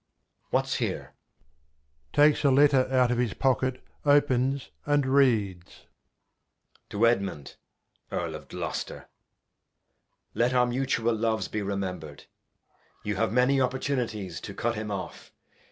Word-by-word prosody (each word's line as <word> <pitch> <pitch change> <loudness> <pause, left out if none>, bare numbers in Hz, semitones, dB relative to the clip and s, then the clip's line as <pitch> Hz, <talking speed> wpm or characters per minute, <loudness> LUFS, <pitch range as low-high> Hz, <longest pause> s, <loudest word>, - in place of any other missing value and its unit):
What's - - 0
here? - - -3 1.0
\Takes 150 +1 +4
a 140 - +5
Letter 135 -1 +5
out 125 -2 +3
of 120 - 0
his 120 -5 0
Pocket; 130 -1 0 0.2
opens, 140 -2 +2
and 145 -1 +2
reads. 115 -10 +1 1.0
To 105 +3 +2
Edmund 100 - 0 0.6
Earl - - -2
of - - -9
Gloster. - - -5 1.2
Let 120 +2 +1
our 125 0 +5
Mutual 120 -2 0
Loves 110 0 0
be 105 - -3
rememhred, 95 -7 -4 0.8
you 105 -2 -2
have 115 +1 +1
many 125 +3 +3
Opportunities 125 - -2
to - - -8
Cut 120 0 -1
him 110 -1 -5
off. 100 -2 -6
120 Hz, 120 wpm, -27 LUFS, 105-135 Hz, 1.2 s, a